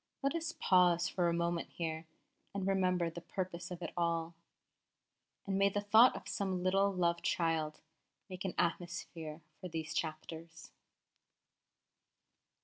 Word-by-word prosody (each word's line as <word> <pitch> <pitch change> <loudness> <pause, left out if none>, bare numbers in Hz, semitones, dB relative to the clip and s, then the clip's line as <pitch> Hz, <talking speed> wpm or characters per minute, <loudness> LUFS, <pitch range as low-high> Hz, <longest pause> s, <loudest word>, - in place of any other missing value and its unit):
Let 275 - +2
us 330 0 -3
pause 175 -2 +4
for 175 -2 +1
a - - +2
moment 170 0 -1
here 160 -1 -4 0.5
and 195 -2 -1
remember 185 -3 +2
the 170 - -7
purpose 180 0 -4
of 180 -1 -6
it - - -5
all; 170 -1 0 1.1
and 195 -1 0
may 200 0 +5
the 205 - -1
thought 220 +5 +7
of - - -8
some 190 -3 -1
little, 195 +2 +3
loved 170 -2 +1
child 160 -2 0 0.5
make 185 -2 -7
an 190 - -3
atmosphere 170 -2 -2 0.2
for 185 - -6
these 160 -2 -4
chapters! 160 +1 -5
175 Hz, 140 wpm, -34 LUFS, 165-190 Hz, 1.1 s, thought